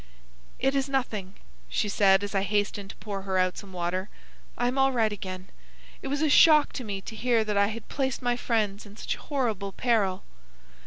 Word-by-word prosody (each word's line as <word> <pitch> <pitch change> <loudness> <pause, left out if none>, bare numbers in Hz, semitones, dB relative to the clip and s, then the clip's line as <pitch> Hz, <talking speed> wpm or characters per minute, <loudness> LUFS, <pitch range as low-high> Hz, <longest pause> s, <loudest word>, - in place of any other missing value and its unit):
"It 270 - +1
is 275 0 0
nothing," 215 -8 -2 0.3
she 135 - 0
said, 195 -1 +4
as 205 - -4
I 195 - +2
hastened 205 0 -1
to - - -9
pour 200 -2 -5
her 190 -1 -2
out 185 0 +2
some 200 -2 -9
water. 185 +2 -2 0.5
"I 245 - +1
am 255 +2 -1
all 270 0 +4
right 225 -4 +2
again. 185 -2 -7 0.5
It - - -5
was 285 +3 -1
a - - +4
shock 300 0 +6
to 255 - -5
me 200 -3 -4
to 220 - -8
hear 235 0 +2
that 210 -1 -2
I 200 0 +4
had 220 +1 -6
placed 265 -2 -2
my 245 0 +2
friends 215 -4 -1
in 205 +1 -14
such - - -3
horrible 220 -9 -2
peril." 205 -6 +1
210 Hz, 205 wpm, -27 LUFS, 195-245 Hz, 0.5 s, shock